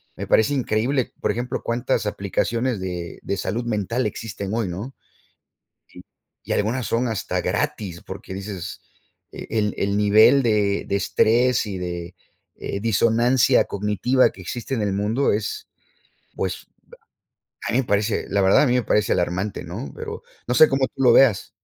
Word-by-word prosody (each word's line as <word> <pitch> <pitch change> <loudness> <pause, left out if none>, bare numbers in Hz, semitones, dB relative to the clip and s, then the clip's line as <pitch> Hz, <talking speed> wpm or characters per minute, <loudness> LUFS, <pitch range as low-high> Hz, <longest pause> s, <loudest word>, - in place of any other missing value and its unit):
me - - -5
parece 110 +6 +3
increíble 125 +1 0
por - - 0
ejemplo 120 +1 -3
cuántas 115 -2 -1
aplicaciones 115 +4 -1
de 90 -2 -5
de 100 - -3
salud 110 +6 -2
mental 115 +1 -1
existen 105 -2 -6
hoy, 115 -3 0
¿no? 100 +10 -6 0.9
Si, - - -14 0.4
y - - -4
algunas 115 +3 -1
son 120 +2 +1
hasta 100 -5 -2
gratis 100 - -2
porque 95 - -8
dices 95 -2 -6 0.5
e - - -9
el 105 -2 0
el 100 +1 0
nivel 110 +6 +5
de 105 -4 +1
de 100 - +1
estrés 115 +5 +2
y 100 -3 -4
de, 85 0 -5 0.4
eh, 100 - -5
disonancia 115 +3 +3
cognitiva 105 +6 +1
que - - -14
existe 120 +7 -4
en 110 - -1
el 100 - 0
mundo 105 +7 +1
es, 105 0 -3 0.7
pues, - - -3 1.0
a - - -1
mí 120 - +2
me 135 - +1
parece, 105 +2 0
la 100 0 +1
verdad, 95 +7 +5
a - - +4
mí 125 - +2
me 125 -2 +2
parece 105 0 +2
alarmante, 90 +3 -2
¿no? 70 - -7
Pero - - -7 0.2
no 125 - +1
sé 155 - +8
cómo 135 -1 +1
tú 135 - -8
lo 120 -2 +6
veas. 120 -7 +4
105 Hz, 165 wpm, -22 LUFS, 100-120 Hz, 1.0 s, sé